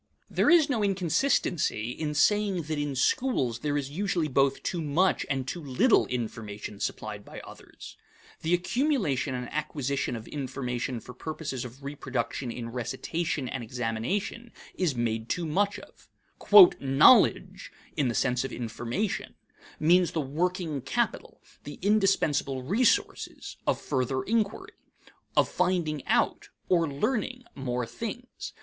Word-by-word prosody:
There - - +3
is 335 -4 +6
no 240 -7 0
inconsistency 180 - +1
in 150 +2 -3
saying 200 +2 +2
that 155 0 -3
in 145 -2 -2
schools 130 - +1
there 145 +2 -1
is 140 -1 -3
usually 175 -1 0
both 135 -1 +1
too 175 - -2
much 160 +5 +1
and 135 -2 -1
too 175 - -4
little 175 - +3
information 110 -4 -5
supplied 105 -1 -4
by - - -10
others. - - -12 0.4
The 165 +2 +2
accumulation 180 - 0
and 125 -1 -4
acquisition 140 -4 -2
of 110 -1 -8
information 130 -3 -3
for 125 - -11
purposes 145 -1 -5
of 125 +3 -11
reproduction 130 -3 -3
in 115 -1 -6
recitation 130 +5 -3
and 125 0 -4
examination 125 - -3 0.2
is 170 -7 0
made 115 -1 -2
too 175 - -1
much 200 +6 +1
of. - - -15 0.7
"Knowledge," 135 - +4 0.2
in 145 -4 +1
the 120 - -1
sense 125 -1 +1
of 135 - -4
information, 120 - -3 0.4
means 175 +3 +4
the 165 - 0
working 160 +1 -2
capital, 135 - -2 0.2
the 145 - -8
indispensable 195 -10 +2
resources, 215 - 0
of - - +2
further 130 -1 -1
inquiry; 215 -1 -1 0.6
of - - +5
finding 160 -6 0
out, - - +1 0.2
or 170 -4 +3
learning, 250 - -1
more 125 -2 -2
things. 230 - -7
145 Hz, 135 wpm, -28 LUFS, 125-185 Hz, 0.7 s, is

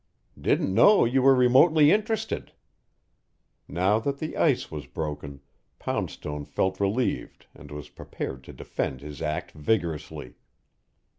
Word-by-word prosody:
"Didn't 95 - +1
know 205 - +6
you 130 +3 +2
were 135 +1 +6
remotely 145 +5 +5
interested." 215 +1 -1 1.1
Now 95 +5 +1
that 140 +4 -2
the 155 +2 -5
ice 145 -7 +1
was 75 -2 -7
broken, 75 -2 -6 0.4
Poundstone 75 0 -4
felt 95 +5 -1
relieved 105 +6 -1
and - - -14
was 75 -1 -8
prepared 65 -1 -7
to - - -11
defend 65 - -4
his 75 +1 -9
act 75 -1 -3
vigorously. 80 -1 -3
95 Hz, 125 wpm, -26 LUFS, -, 1.1 s, know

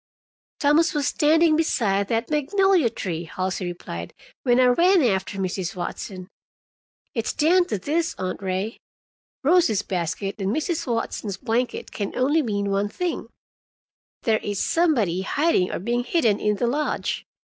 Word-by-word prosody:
"Thomas 300 +3 +3
was 290 -1 +1
standing 315 +2 +4
beside 205 -11 +1
that 230 +5 -1
magnolia 350 - +3
tree," 175 -6 -4
Halsey 185 +2 -3
replied, 85 - -7 0.3
"when 245 -1 +3
I 255 - +6
ran 340 +8 +4
after 195 -3 0
Mrs. 185 -1 -2
Watson. 185 +1 -5 0.9
It's 230 -3 -2
down 350 +4 +3
to 210 - -1
this, 315 - -1
Aunt 185 +1 -4
Ray. 190 +3 -3 0.6
Rosie's 305 - +3
basket 195 +3 -3
and 195 - 0
Mrs. 310 - -1
Watson's 220 -3 -3
blanket 240 +2 -2
can 200 -2 -4
only 290 +5 +2
mean 200 -5 -1
one 200 +1 0
thing: 355 +9 -3 1.0
there 220 -2 +2
is 205 -1 -2
somebody 235 - +2
hiding 280 - +1
or - - -2
being 240 +6 -1
hidden 235 -8 +2
in 210 0 +1
the 240 - -1
lodge. 290 +6 -1
230 Hz, 145 wpm, -24 LUFS, 195-300 Hz, 1.0 s, I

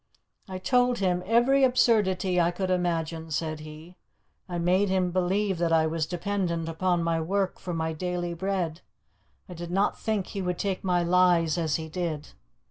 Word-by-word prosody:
"I 185 - -4
told 245 +5 +2
him 180 -2 0
every 245 +5 +4
absurdity 195 -8 +3
I 170 - +3
could 185 +1 -2
imagine," 165 -2 -1
said 155 0 -2
he. 155 +3 -11 0.5
"I 175 - -3
made 185 +4 +2
him 185 -1 +1
believe 185 +1 0
that 170 -1 +1
I 160 -1 +4
was 160 -1 -1
dependent 175 -2 -2
upon 175 +1 0
my 165 -1 0
work 190 +3 -1
for 180 - -6
my 160 -1 -2
daily 175 +1 -3
bread. 180 -2 -2 0.7
I 180 - -8
did 170 0 -7
not 195 +3 0
think 215 -4 -1
he 195 - -5
would 180 -1 -2
take 195 -2 -2
my 180 -2 +1
lies 175 -2 +3
as 160 -4 0
he 160 -1 -3
did. 160 -3 -4
180 Hz, 175 wpm, -27 LUFS, 165-190 Hz, 0.7 s, every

